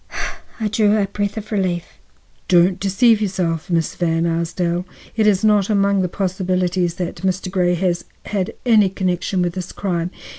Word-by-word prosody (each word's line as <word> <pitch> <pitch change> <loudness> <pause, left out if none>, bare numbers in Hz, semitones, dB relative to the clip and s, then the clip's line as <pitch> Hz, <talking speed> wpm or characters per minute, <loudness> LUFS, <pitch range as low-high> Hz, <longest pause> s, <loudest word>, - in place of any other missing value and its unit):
I 220 - 0
drew 215 0 +3
a 205 - +2
breath 205 +1 -3
of 215 0 -6
relief. 185 -4 -2 0.5
"Don't 180 +1 +4
deceive 210 +3 +3
yourself, 180 -5 -1
Miss 165 -3 0
Van 165 -1 0
Arsdale; 170 +1 -1 0.3
it 220 -2 +3
is 200 -2 +3
not 210 -2 +3
among 200 -1 +2
the 180 - -1
possibilities 180 -2 -1
that 180 -2 -4
Mr. 185 0 -2
Grey 180 -2 +2
has 175 -1 -1 0.2
had 195 -3 -2
any 215 -5 +5
connection 185 0 -1
with 175 -1 -1
this 185 -1 -5
crime. 175 -3 -2
185 Hz, 160 wpm, -20 LUFS, 175-200 Hz, 0.5 s, any